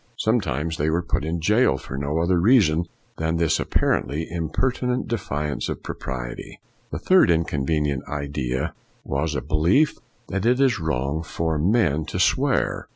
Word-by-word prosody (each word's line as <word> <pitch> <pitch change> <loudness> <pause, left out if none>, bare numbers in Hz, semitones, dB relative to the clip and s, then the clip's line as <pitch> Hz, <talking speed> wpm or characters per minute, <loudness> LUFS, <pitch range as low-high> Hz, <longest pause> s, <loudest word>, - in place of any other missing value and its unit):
Some 115 +2 +2
times 80 0 -3
they 75 +2 0
were 85 +3 0
put 80 - -1
in 80 +2 -2
jail 105 +9 +3
for 65 - -8
no 70 +3 -2
other 85 +2 +2
reason 85 -6 +4 0.3
than 80 +1 -1
this 80 -2 +2
apparently 80 +3 0
impertinent 125 - -1
defiance 75 -10 -3
of - - -5
propriety. 60 -2 -6 0.3
The - - -4
third 185 - +4
inconvenient 75 -4 0
idea 70 -3 -3 0.3
was 75 +3 -2
a - - -1
be - - -10
lief 90 - +3 0.3
that 95 0 -2
it 125 +3 +3
is 130 -6 +3
wrong 75 -1 -1
for 80 -1 -2
men 80 -4 +2
to - - -5
swear. - - +1
80 Hz, 155 wpm, -23 LUFS, 75-95 Hz, 0.3 s, reason